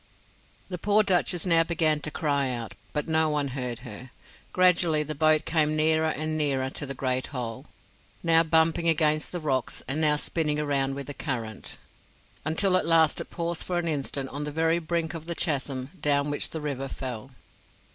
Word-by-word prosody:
The 180 -2 -4
poor 210 +4 +3
Duchess 180 -2 +1
now 165 -2 +5
began 160 -2 +1
to 155 - -3
cry 140 -3 0
out; 120 -3 -5 0.2
but 150 +1 -2
no 160 -1 +3
one 145 -2 0
heard 125 -2 -3
her. 125 +2 -9 0.4
Gradually 175 -4 +3
the 155 +1 -5
boat 155 +1 +3
came 155 -2 +2
nearer 160 +1 +3
and 155 0 -2
nearer 135 -4 0
to 145 - -4
the 135 - -4
Great 130 0 -1
Hole, 120 -4 -6 0.6
now 165 -1 +6
bumping 165 +1 +3
against 155 -1 +2
the 175 - -3
rocks 135 -5 -2
and 145 +4 0
now 150 -1 +5
spinning 150 0 -1
around 140 -2 0
with 140 0 -5
the 145 - -7
current, 115 -8 -5 0.7
until 185 +5 +2
at 175 - -1
last 165 -2 +4
it - - -8
paused 170 -1 -3
for 180 - -2
an 175 -1 -1
instant 140 -3 -2
on 145 +1 -5
the 150 - -4
very 165 +2 +1
brink 165 0 -2
of 165 -2 -7
the 170 0 -3
chasm 135 -5 -2
down 145 0 +2
which 145 - -1
the 160 - -5
river 135 -2 -3
fell. 130 -3 -6
155 Hz, 185 wpm, -27 LUFS, 140-165 Hz, 0.7 s, now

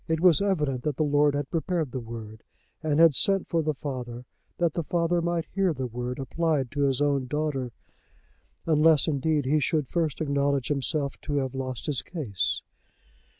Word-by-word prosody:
It 160 -1 0
was 180 0 +5
evident 150 -10 0
that 150 -1 -2
the - - +2
lord 145 0 +3
had 145 -1 -3
prepared 165 -3 -1
the 130 - -3
word, 115 -2 -8 0.4
and 155 -2 +1
had 165 -2 +7
sent 195 +7 +2
for 165 - +1
the 155 -1 -1
father 125 -3 -6 0.3
that 170 -3 +1
the 170 - -1
father 170 +1 +1
might 170 -1 -1
hear 190 -3 +2
the 130 -1 -3
word 125 +1 -4
applied 140 -1 -1
to 145 -1 +1
his 135 +1 +1
own 140 -3 +1
daughter, 140 -3 -2 0.9
unless 155 -1 +4
indeed 150 -1 +1
he 150 +4 +3
should 150 -1 0
first 160 -5 -1
acknowledge 140 -3 0
himself 140 0 -1
to 145 - -3
have 135 -2 -1
lost 130 -2 -4
his 145 -4 -1
case. 125 - -2
145 Hz, 180 wpm, -27 LUFS, 130-160 Hz, 0.9 s, had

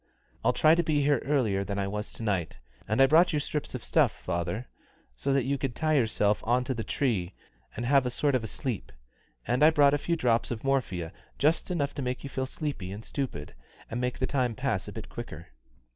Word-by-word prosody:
I'll 120 - +4
try 155 +5 +5
to 170 - +4
be 155 -3 +1
here 145 -3 +3
earlier 120 -9 +1
than 100 +1 -4
I 100 -1 0
was 105 +1 -4
to - - -7
night. 95 - -1 0.3
And 110 +4 0
I 135 - +8
brought 165 +5 +5
you 150 - +2
strips 145 +1 -3
of - - -6
stuff, - - +3
father, 90 +7 -3 0.5
so 60 - -1
that 135 -3 +2
you 140 +1 0
could 130 -4 -2
tie 155 0 +1
yourself 110 -6 +2
on 125 +2 +2
to 130 - -2
the 115 -2 -4
tree 100 -11 -1 0.4
and 120 - -3
have 135 0 +4
a - - +1
sort 140 +3 +1
of 130 -3 +1
a - - -3
sleep; 125 -2 -4 0.5
and 125 +4 0
I 155 - +8
brought 145 -3 +5
a 145 - +2
few 170 +3 0
drops 120 -7 +1
of 115 -3 -4
morphia, 120 -12 -1 0.2
just 155 +6 +2
enough 145 -6 -1
to - - -4
make 125 -1 -3
you 140 - -6
feel 130 0 -2
sleepy 130 - -4
and 105 +3 -7
stupid, 100 - -4 0.4
and 120 +2 -2
make 125 0 -1
the 130 - 0
time 125 -4 0
pass 130 -7 -1
a - - -6
bit - - -7
quicker." - - -8
125 Hz, 230 wpm, -28 LUFS, 110-140 Hz, 0.5 s, I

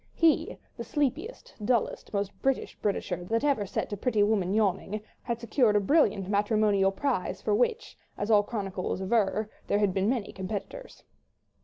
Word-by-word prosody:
He, 330 -2 +2 0.2
the - - -4
sleepiest, 305 - -2
dullest, 235 +1 0
most 200 -1 -1
British 270 -1 0
Britisher 180 -3 -1
that 230 +7 0
had 295 - +4
ever 210 -7 -2
set 205 - -3
a - - -3
pretty 215 -1 +2
woman 205 -3 +1
yawning, 205 0 0 0.2
had 235 -1 -3
secured 235 -1 +2
a - - +6
brilliant 200 - +2
matrimonial 205 -1 +2
prize 195 -5 -2
for 210 - 0
which, 335 - 0 0.2
as 205 +2 -1
all 210 -1 +7
chroniclers 195 -4 -3
aver, 210 +1 +1 0.2
there - - +2
had 205 -3 +2
been 195 +2 +1
many 240 -5 -1
competitors. 205 - -6
210 Hz, 165 wpm, -28 LUFS, 195-245 Hz, 0.2 s, all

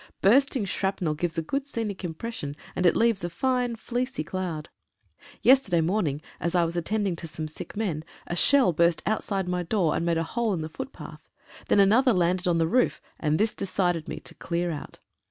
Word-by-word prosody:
Bursting 260 +2 +4
shrapnel 190 -4 -1
gives 165 +2 -3
a 165 - 0
good 275 - -2
scenic 215 -8 -4
impression, 160 -3 -5 0.2
and 180 - +3
it - - +4
leaves 230 -5 +2
a 175 - -1
fine 250 +4 0
fleecy 245 -4 -3
cloud. 170 -3 -4 0.8
Yesterday 245 -10 +5
morning, 160 -5 0 0.2
as 170 +2 -1
I 175 -1 +4
was 165 +1 -4
attending 195 +2 0
to 165 - -6
some 155 0 -5
sick 155 +6 -8
men, 175 -9 -1 0.2
a 175 - -3
shell 260 -2 +5
burst 170 +1 +2
outside 195 -3 -1
my 180 0 0
door 175 -3 +1
and - - -1
made 170 -1 +1
a 165 - +1
hole 225 +4 -1
in 165 - -3
the 155 - -4
footpath, 215 +11 -9 0.4
then - - +4
another 230 +6 +5
landed 180 0 +1
on 170 -1 +3
the 165 - +3
roof, 250 +9 +2 0.2
and 155 -1 +1
this 215 +2 +1
decided 180 -4 -1
me - - -5
to - - -7
clear 175 0 -2
out. 150 - -7
180 Hz, 195 wpm, -26 LUFS, 165-220 Hz, 0.8 s, Yesterday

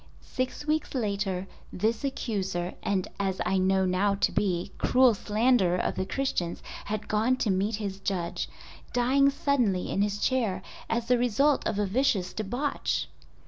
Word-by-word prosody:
Six 255 +3 -2
weeks 310 -1 -1
later 200 -5 -1 0.3
this 220 +5 0
accuser, 195 -10 -2
and 195 -3 0
as 190 -1 -1
I 190 - +2
know 190 0 +3
now 190 +2 +2
to 195 - +1
be, 185 -2 0
cruel 255 -1 +5
slanderer 210 -3 +2
of - - 0
the 185 - -3
Christians 195 -11 -2 0.2
had 215 0 -3
gone 220 +4 +2
to 220 - +1
meet 200 +4 +1
his 200 -2 -4
Judge—dying 245 +8 0
suddenly 250 -10 +1
in 195 - +1
his 205 0 0
chair 210 -6 0 0.3
as 230 0 -1
the 250 -1 +3
result 265 +5 +2
of - - -1
a 205 - +1
vicious 195 -4 +1
debauch! 245 +7 -2
210 Hz, 150 wpm, -28 LUFS, 190-250 Hz, 0.3 s, cruel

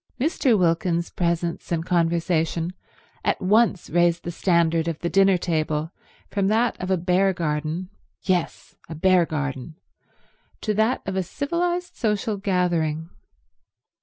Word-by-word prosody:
Mr. 265 - +2
Wilkins's 170 -1 +1
presence 170 -1 -2
and 165 -1 -1
conversation 170 -1 0 0.5
at - - +1
once 205 -1 +2
raised 175 0 +2
the 175 - -4
standard 170 -2 +1
of 165 -2 -2
the 170 - -3
dinner 195 -1 +5
table 155 -2 -1 0.4
from 200 -2 +1
that 225 +4 +2
of 185 - -4
a 190 - +2
bear 185 +3 +2
garden—yes, 170 +3 -3 0.2
a 160 - -6
bear 180 +1 +3
garden—to 150 - -7
that 220 +5 +1
of 195 - -3
a 190 - +1
civilized 345 - -2
social 210 -1 -1
gathering. 170 -5 0
175 Hz, 125 wpm, -24 LUFS, 165-195 Hz, 0.5 s, dinner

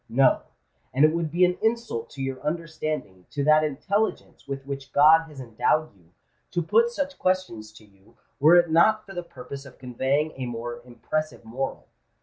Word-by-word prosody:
No: 130 +2 +4 0.5
and 140 +3 +6
it 155 - +3
would 170 -1 -1
be 175 +3 +4
an 180 0 -1
insult 225 - -1
to 135 -2 -6
your 135 -1 -4
understanding—to 155 - -4
that 155 +1 +5
intelligence 195 +10 -2
with 135 -1 -5
which 135 -1 -7
God 160 +3 +6
has 145 -3 -12
endowed 125 +5 0
you—to 90 - -8
put 225 +9 +3
such 280 +3 -4
questions 185 -13 -1
to 110 0 -16
you, 100 +3 -25 0.2
were 155 +5 +7
it 175 -2 +4
not 215 +7 +4
for 195 - -11
the 175 - -3
purpose 135 -4 -9
of 140 - -14
conveying 135 +5 -1
a 130 -2 -4
more 120 0 -5
impressive 155 +3 -4
moral. 130 +4 -4
145 Hz, 170 wpm, -25 LUFS, 125-170 Hz, 0.5 s, were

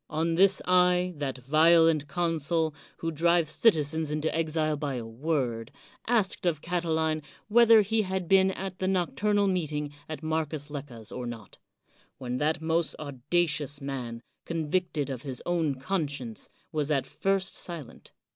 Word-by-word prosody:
On 165 +2 0
this 190 +3 +4
I, 180 0 +3
that 135 -2 -3
violent 155 +3 +4
consul, 165 -2 0 0.2
who 165 - -3
drive 170 +2 +3
citi 165 +2 +3
zens 155 +1 -2
into 155 +1 -1
exile 155 -1 0
by 145 -2 -3
a 120 -2 -4
word, 120 -2 -2 0.4
asked 215 -6 +1
of 160 -4 +1
Catiline 160 -2 0 0.3
whether 230 0 +7
he 220 +2 +1
had 190 -3 -3
been 190 +1 +5
at 190 -1 -5
the 185 - 0
nocturnal 200 +3 +1
meeting 150 -6 -1 0.2
at 155 -2 -6
Marcus 155 -2 -2
Lecca's 130 -7 -7
or 125 -1 -5
not; 115 -4 -9 0.6
when 125 -1 -3
that 155 +2 0
most 165 +1 0
audacious 145 +1 -1
man, 125 -4 -5 0.2
convicted 165 -2 -1
of 125 -3 -5
his 130 -3 -4
own 165 -5 0
conscience, 140 - -3 0.2
was 150 -2 -1
at 135 -4 +1
first 195 +5 -1
silent. 165 -8 -6
160 Hz, 145 wpm, -28 LUFS, 145-175 Hz, 0.6 s, whether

